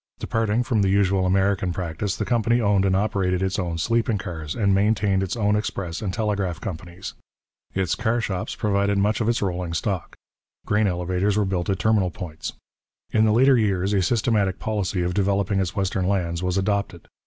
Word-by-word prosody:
Departing 115 +1 0
from 115 -3 +1
the 95 - +2
usual 95 -1 +2
American 95 -1 +1
practice, 85 +2 -3
the - - -2
company 120 0 +2
owned 100 -3 +2
and 95 -1 +2
operated 95 -2 0
its 95 -1 -1
own 85 -3 -2
sleeping 115 +4 +1
cars, 80 -7 -5
and 100 -4 +2
maintained 100 -1 +2
its 95 +3 -2
own 105 -2 +2
express 95 -5 -3
and 100 -3 -2
telegraph 100 -5 -1
companies. 90 +1 -7 0.6
Its 95 -3 0
car 115 +1 0
shops 95 -5 -3
provided 100 -2 +1
much 105 +5 +1
of 115 - +1
its 120 -3 +1
rolling 90 -3 -2
stock. 95 -1 -3 0.5
Grain 105 0 +2
elevators 90 +3 0
were 105 - +2
built 95 -2 -2
at 95 - +1
terminal 100 -1 +2
points. 85 -3 -7 0.6
In 110 0 +3
the 110 - +3
later 130 +3 +5
years 100 -2 +1
a 100 - +3
systematic 100 -1 +1
policy 100 -4 -1
of 90 +1 -1
developing 100 0 +1
its 95 0 -2
western 95 -2 0
lands 85 -4 -1
was 90 0 -1
adopted. 95 -3 -1
100 Hz, 185 wpm, -23 LUFS, 90-105 Hz, 0.6 s, later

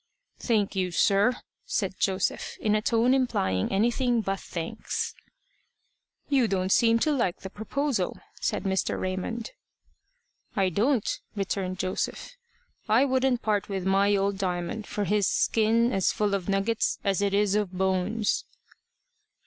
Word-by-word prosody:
"Thank 210 -5 0
you, 185 -1 0
sir," 200 +7 +3 0.3
said 195 -3 -1
Joseph, 190 0 -1
in 210 - +1
a 215 - +2
tone 230 +3 +3
implying 95 - 0
anything 240 +4 +2
but 195 -2 -2
thanks. 175 +6 -4 1.1
"You 270 -5 +3
don't 190 -2 -1
seem 230 +1 +5
to 305 - +2
like 235 -11 0
the 190 - -7
proposal," 270 +5 -2 0.2
said - - -1
Mr. 190 -1 0
Raymond. 190 +5 -3 1.0
"I 195 -3 +2
don't," 225 - +1 0.3
returned 190 -2 -2
Joseph. 185 - -3 0.5
"I 230 +6 +5
wouldn't 260 -2 +1
part 210 -2 0
with 190 -2 -3
my 200 +1 +3
old 195 0 0
Diamond 185 +3 -2
for 210 - -2
his 205 0 +2
skin 230 +2 +2
as 190 -1 +2
full 210 -1 0
of 195 -1 -2
nuggets 200 +3 +1
as 195 -1 +1
it 200 -1 +1
is 205 -1 +2
of 210 -3 0
bones." 190 +3 0
205 Hz, 140 wpm, -27 LUFS, 190-230 Hz, 1.1 s, seem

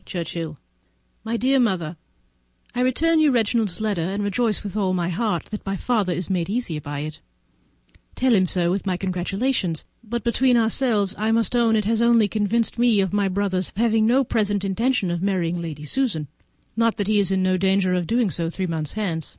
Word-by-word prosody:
_ - - -32
Churchhill 165 -3 -5 0.7
My 230 +1 -2
dear 265 +3 +2
Mother,—I 110 - -5
return 315 +6 +2
you 310 -1 +5
Reginald's 225 -5 +1
letter, 210 -5 -1
and 195 +5 -2
rejoice 215 +2 0
with 205 -1 -6
all 195 -3 0
my 175 -1 -1
heart 180 -1 -1
that 210 - -5
my 195 0 -3
father 215 -6 0
is 180 0 -2
made 180 -2 -1
easy 205 -8 -2
by 145 0 -5
it: 155 +1 -7 0.9
tell 255 -1 +2
him 185 -3 +3
so, 175 -1 +1
with 195 +2 -2
my 185 -1 0
congratulations; 185 0 -1 0.2
but, 235 +1 -4
between 245 +1 +3
ourselves, 220 -3 +2
I 215 +1 +1
must 230 0 +1
own 230 -2 +3
it 215 -2 +1
has 225 +1 +1
only 235 -2 +4
convinced 220 +3 -1
me 240 -4 +4
of 190 0 0
my 205 -1 +2
brother's 190 -1 -1
having 225 -1 +2
no 260 +4 +4
present 205 -4 0
intention 220 0 0
of 175 -1 -2
marrying 175 -3 -1
Lady 155 -3 -6
Susan, 160 - -1 0.5
not 230 0 +1
that 205 - -1
he 210 +1 +2
is 195 -2 +2
in 190 -1 +1
no 185 0 +2
danger 190 0 +2
of 180 -2 -1
doing 230 -4 +1
so 165 -1 -1
three 185 +2 -3
months 160 -4 -2
hence. 175 -8 -2
200 Hz, 200 wpm, -23 LUFS, 175-230 Hz, 0.9 s, you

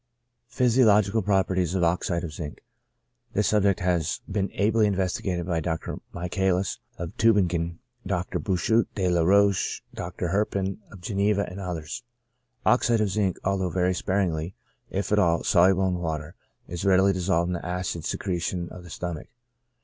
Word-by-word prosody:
PHYSIOLOGICAL 115 -4 +3
PROPERTIES 95 -3 +1
OF 90 - +1
OXIDE 85 0 0
OF 85 - -4
ZINC. 75 -1 -6 0.8
This 105 - +2
subject 100 -3 +2
has 90 -3 0
been 100 -1 -1
ably 105 +1 +3
investigated 95 -2 -1
by 85 -2 0
Dr. 80 0 -3
Michaelis 90 +2 -1 0.2
of 85 -1 -6
Tubingen, 90 -7 +2 0.3
Dr. 90 0 -1
Bouchut, 110 +3 +1
De 95 -3 0
la 90 -1 +2
Roche, 100 +2 +3
Dr. 85 - -4
Herpin 95 0 -1
of 95 - -12
Geneva, 100 +2 +1
and 90 +2 -8
others. 90 +1 -5 0.6
Oxide 120 -2 +3
of 105 - +1
zinc, 100 -3 0
although 95 -1 0
very 90 +1 +1
sparingly, 90 -2 -1 0.3
if 100 +2 -3
at 105 - +4
all, 85 -4 +2
soluble 95 +2 +4
in 90 -1 -1
water, 80 -1 -3 0.3
is 85 +1 -5
readily 95 0 +4
dissolved 85 -1 +1
in - - -1
the 85 - -4
acid 90 -2 -3
secretion 90 -1 -2
of 90 - -10
the 85 - -12
stomach. 85 -2 -5
95 Hz, 150 wpm, -26 LUFS, 85-100 Hz, 0.8 s, at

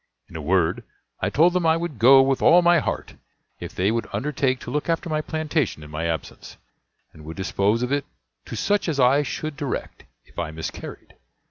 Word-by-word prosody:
In - - -14
a 80 - -4
word, 85 +2 +1 0.4
I - - 0
told 170 +5 +4
them 180 -2 +1
I 160 0 +4
would 165 -8 -5
go 135 +4 +8
with 135 0 0
all 175 +1 +6
my 175 -1 +5
heart, - - -4 0.5
if - - -8
they 95 +3 +1
would 115 0 -2
undertake 135 -3 -1
to - - -7
look 150 +3 -2
after 165 0 -1
my 155 0 0
plantation 155 - -2
in 75 - -12
my 80 +2 -2
absence, 80 -1 -6 0.6
and 75 - -14
would 80 +2 -9
dispose 100 +4 0
of 125 - -2
it 145 -1 0 0.4
to - - -7
such 205 -3 0
as 145 -3 -2
I 130 +3 +5
should 155 +1 -4
direct, 145 -3 -5 0.2
if - - -11
I 85 -2 -2
miscarried. 80 +1 -8
135 Hz, 205 wpm, -23 LUFS, 95-155 Hz, 0.6 s, go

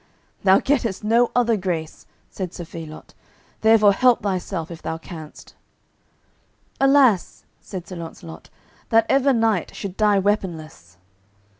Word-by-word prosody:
"Thou 190 -1 +6
gettest 235 -8 -1
no 230 +3 +3
other 235 -2 +3
grace," 175 -5 -4 0.2
said 185 -2 -6
Sir 175 - -7
Phelot; 160 -1 -10 0.5
"therefore 220 -2 +5
help 250 +3 +3
thyself 185 -4 -3
if 165 - -9
thou 160 - -4
canst." 160 -2 -11 1.3
"Alas," 270 -8 +3
said 185 -3 -8
Sir 185 - -8
Launcelot, 85 - -10 0.4
"that 225 0 +4
ever 275 0 +3
knight 225 -7 0
should 195 -2 -6
die 210 -2 +3
weaponless." 160 - -3
195 Hz, 125 wpm, -22 LUFS, 165-225 Hz, 1.3 s, Thou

